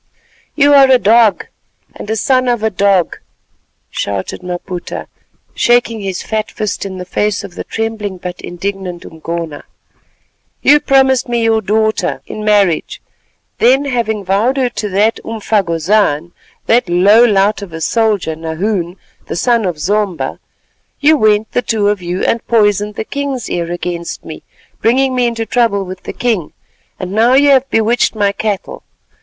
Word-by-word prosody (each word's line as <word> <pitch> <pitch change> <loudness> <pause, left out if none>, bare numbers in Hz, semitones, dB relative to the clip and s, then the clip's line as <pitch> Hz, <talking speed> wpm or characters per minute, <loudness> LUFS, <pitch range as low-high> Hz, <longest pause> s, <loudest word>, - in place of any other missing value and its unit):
"You 285 -1 +4
are 275 -1 +7
a 260 - +7
dog, 225 -1 +3 0.5
and - - -9
a 220 - 0
son 255 +4 +1
of 240 -3 0
a 220 - +1
dog," 195 -2 +1 0.7
shouted 100 - -4
Maputa, 180 0 -6 0.5
shaking 240 -2 +2
his 195 -3 -4
fat 215 -1 -2
fist 210 -1 -3
in 190 -1 -7
the 180 - -6
face 205 +3 -1
of 200 -3 -9
the - - -6
trembling 220 -3 -4
but 180 0 -7
indignant 180 -1 -5
Umgona. 165 -1 -6 1.0
"You 295 +1 +6
promised 265 -3 +2
me 235 -1 0
your 225 -1 +2
daughter 220 +2 0
in 215 - -7
marriage, 200 -6 +1 0.6
then 265 +4 +4
having 225 -6 -2
vowed 210 +8 +1
her 255 -2 +1
to 215 -3 -4
that 205 +4 +1
umfagozan—that 200 0 0
low 200 +6 +5
lout 205 -2 +2
of 200 -4 -8
a 165 - -6
soldier, 205 -2 0
Nahoon, 170 +3 -3 0.3
the - - -4
son 235 +3 +1
of 175 -4 -2
Zomba—you 200 - -2
went, 215 -3 +2
the 245 - +1
two 215 -3 0
of 205 -2 -1
you, 175 +1 -3
and 230 - 0
poisoned 210 -2 +2
the - - -3
king's 280 -3 -4
ear 170 -1 -2
against 175 -1 -5
me, - - -8 0.4
bringing 260 +3 +2
me 250 -1 +2
into 230 -1 -3
trouble 225 -5 +1
with 185 0 -8
the - - -6
king, 220 -10 -1 0.5
and 185 0 -5
now 230 +5 +3
you 285 +1 +5
have 270 0 +3
bewitched 225 +1 +1
my 205 -2 +2
cattle. 205 -1 -4
210 Hz, 155 wpm, -15 LUFS, 185-235 Hz, 1.0 s, are